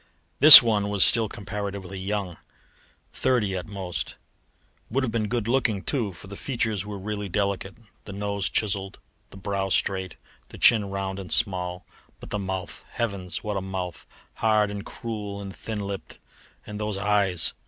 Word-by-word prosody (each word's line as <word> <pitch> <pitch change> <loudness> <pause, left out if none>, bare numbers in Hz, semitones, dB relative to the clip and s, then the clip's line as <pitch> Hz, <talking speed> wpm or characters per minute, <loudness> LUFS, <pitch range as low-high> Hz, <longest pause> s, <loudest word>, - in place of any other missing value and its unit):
This 145 -2 +14
one 105 -3 0
was 100 -2 +3
still 115 -2 +3
comparatively 100 -2 -6
young, 95 -2 -4 0.8
thirty 120 -7 0
at 90 - -5
most; 90 -8 -5 0.7
would 135 +4 -1
have 125 - -2
been 110 -2 -1
good 115 -1 -2
looking 115 -5 0
too, 120 -8 -1
for 85 +1 -13
the 100 +1 -9
features 110 -5 -2
were 105 0 -7
really 100 0 -5
delicate, 100 0 -2 0.3
the - - -8
nose 100 -1 -2
chiselled, 100 -2 -1 0.3
the - - -13
brow 95 0 -3
straight, 95 -1 -1 0.3
the - - -12
chin 110 -3 +5
round 95 0 -4
and 95 -3 -9
small. 90 -3 -2 0.3
But - - -12
the 105 - -2
mouth! 95 -1 -5
Heavens, 100 -6 -4
what 105 -2 -3
a - - -2
mouth! 95 -3 -6 0.3
Hard 110 -2 +1
and 100 -1 -6
cruel 105 -4 -7
and 100 -1 -8
thin 110 -2 -6
lipped; 100 -1 -7 0.5
and 105 0 -8
those 105 -2 -3
eyes! 100 -4 0
100 Hz, 165 wpm, -25 LUFS, 95-105 Hz, 0.8 s, This